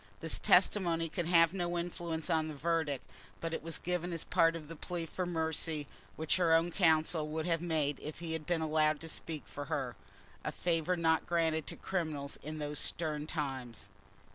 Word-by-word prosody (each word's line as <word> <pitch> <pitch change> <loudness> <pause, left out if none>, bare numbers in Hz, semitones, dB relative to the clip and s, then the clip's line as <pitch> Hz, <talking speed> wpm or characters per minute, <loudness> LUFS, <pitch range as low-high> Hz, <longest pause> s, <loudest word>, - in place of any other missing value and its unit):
This 160 - 0
testimony 175 -3 +4
could 170 0 -2
have 165 -1 +5
no 175 -2 -1
influence 170 -1 -2
on 160 -1 +2
the 155 - -5
verdict, 160 -2 0 0.3
but 165 0 -3
it - - -2
was 165 0 -1
given 180 0 -2
as 165 - -2
part 165 0 +3
of 155 -3 -7
that 165 -1 -10
plea 175 -2 -3
for 180 +2 -3
mercy 160 -2 0 0.3
which 160 +2 +1
her 170 -3 +5
own 165 +2 +3
counsel 160 -3 +3
would 155 +1 -2
have 165 -2 +1
made 155 -5 0
if 150 +1 -6
he 165 -1 -4
had 160 -1 -4
been 175 -2 +1
allowed 155 -1 +2
to 165 - -6
speak 160 -1 -4
for 145 - -6
her—a 130 -3 -5
favour 175 +1 0
not 160 -1 +2
granted 160 -2 +1
to - - -4
criminals 155 -6 -3
in 155 +1 -5
those 150 -1 -2
stern 155 -2 0
times. 135 -8 -4
160 Hz, 190 wpm, -33 LUFS, 155-170 Hz, 0.3 s, have